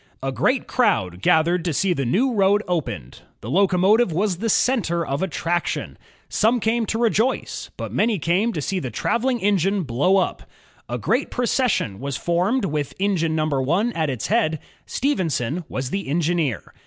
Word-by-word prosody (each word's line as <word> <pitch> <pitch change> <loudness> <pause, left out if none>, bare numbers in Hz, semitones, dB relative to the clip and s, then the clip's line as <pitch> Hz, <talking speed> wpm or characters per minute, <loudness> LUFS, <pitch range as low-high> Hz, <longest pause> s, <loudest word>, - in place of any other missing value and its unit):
A 135 - -1
great 255 - +1
crowd 95 - 0
gathered 165 - +3
to 170 -2 -1
see 190 +5 +1
the 140 -6 -2
new 245 - +2
road 205 0 +3
opened. 140 - -3 0.2
The 115 - -6
locomotive 195 - +3
was 185 +2 0
the 225 +5 -2
center 190 -9 +1
of 140 +2 -2
attraction. 175 -1 -2 0.3
Some 230 +3 +2
came 225 0 0
to 225 - -1
rejoice, 235 +2 0
but - - -6
many 220 -1 +2
came 180 +8 +1
to 155 - -3
see 195 +4 -1
the 130 - -4
traveling 245 - 0
engine 195 -1 +1
blow 145 +9 +2
up. 190 - 0 0.5
A - - -2
great - - 0
procession 245 - 0
was 140 +1 -3
formed 185 +8 0
with 150 -4 -3
engine 180 -5 0
number 155 -3 0
one 185 - +1
at 160 -2 -1
its 130 -4 -3
head. 205 -8 +1 0.3
Stephenson 170 - -1
was 130 +1 -4
the 195 -5 -3
engineer. 160 -5 -1
180 Hz, 165 wpm, -22 LUFS, 155-215 Hz, 0.5 s, gathered